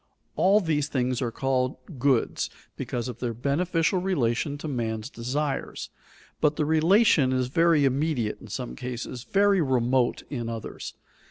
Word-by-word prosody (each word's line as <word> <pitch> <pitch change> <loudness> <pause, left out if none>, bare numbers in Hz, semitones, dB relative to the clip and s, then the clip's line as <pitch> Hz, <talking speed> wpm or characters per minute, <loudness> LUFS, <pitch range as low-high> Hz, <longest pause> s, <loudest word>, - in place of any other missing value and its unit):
All 195 +3 +5
these 150 -5 0
things 130 -3 -1
are 120 - 0
called 130 +1 -1 0.2
goods, 130 -2 +1 0.3
because 120 0 -3
of 120 -2 -6
their 120 -2 -2
beneficial 165 - +1
relation 145 -6 0
to 150 - -6
man's 115 -3 -3
desires, 135 +4 -3 0.5
but 150 -1 +2
the 150 - 0
relation 160 - +4
is 130 -1 0
very 165 0 +4
immediate 135 -4 0
in - - -11
some - - -5
cases, 120 - -6
very 200 -1 +3
remote 130 -2 +1
in 120 -5 -3
others. 115 -2 -6
135 Hz, 145 wpm, -26 LUFS, 120-155 Hz, 0.5 s, All